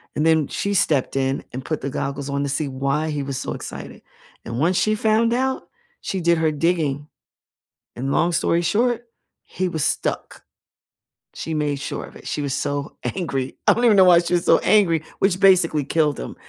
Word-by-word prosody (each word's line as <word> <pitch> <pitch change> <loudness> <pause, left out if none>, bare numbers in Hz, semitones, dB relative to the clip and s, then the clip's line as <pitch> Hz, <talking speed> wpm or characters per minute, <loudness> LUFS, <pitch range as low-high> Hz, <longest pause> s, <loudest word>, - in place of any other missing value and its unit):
and 150 - 0
then 160 -3 +3
she 200 - -2
stepped 150 -9 +1
in 135 0 -1
and 130 +1 -7
put 155 - -3
the 140 - -3
goggles 140 +1 -4
on 140 0 -1
to 140 - -2
see 145 +2 -1
why 140 +3 -1
he 145 -2 -2
was 135 -1 -4
so - - -4
excited, - - -8 0.4
and 115 +1 -4
once 175 +5 +2
she 215 0 +2
found 220 +2 +2
out, 260 +2 -1 0.4
she 190 - -3
did 170 0 +3
her 160 -1 +1
digging 150 -2 -1 0.9
and 135 +3 -3
long 170 +4 +2
story 170 0 +1
short, 235 +7 0 0.4
he 185 0 -3
was 160 -4 -2
stuck. - - -2 0.9
She 160 - -5
made 150 -2 -1
sure 140 - -5
of - - -15
it, - - -12
she - - -2
was 140 -2 -2
so 145 +1 -3 0.2
angry 135 -8 -3
I - - +7
don't 240 - 0
even 220 -4 +5
know 190 - +8
why 180 -2 +7
she 170 +1 -2
was 175 -1 +1
so - - +5
angry, 170 -7 +3 0.2
which 190 -2 +1
basically 175 -7 +4
killed 150 -1 +1
him, - - -6
160 Hz, 200 wpm, -22 LUFS, 140-185 Hz, 0.9 s, know